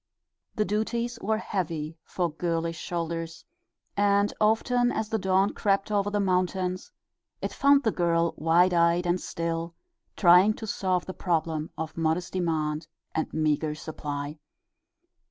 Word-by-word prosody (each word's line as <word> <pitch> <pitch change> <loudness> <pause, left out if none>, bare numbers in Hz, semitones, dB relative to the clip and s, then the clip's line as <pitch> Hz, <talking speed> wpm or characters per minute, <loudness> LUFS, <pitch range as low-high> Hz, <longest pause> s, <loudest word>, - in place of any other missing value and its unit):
The 215 - +1
duties 235 +3 -1
were 215 +2 +1
heavy 165 -7 -3
for 175 -3 -2
girlish 165 0 -2
shoulders, 165 -1 -4 0.5
and 200 0 +3
often 245 +3 +3
as 220 -1 -2
the 220 - 0
dawn 190 +1 +2
crept 200 +1 0
over 205 -1 +1
the 205 0 -1
mountains 185 -1 0 0.5
it - - -4
found 280 0 +4
the 220 - +2
girl 170 -2 +1
wide 170 +3 +3
eyed 170 +1 +3
and 175 +1 +1
still, 165 0 -3 0.4
trying 185 +3 +6
to 220 - -7
solve 185 -4 -1
the 185 - -6
problem 160 -4 -1
of 160 0 -5
modest 165 +2 0
demand 160 -4 -1 0.3
and 160 - -2
meager 155 -1 0
supply. 150 -1 -5
175 Hz, 135 wpm, -27 LUFS, 165-200 Hz, 0.5 s, trying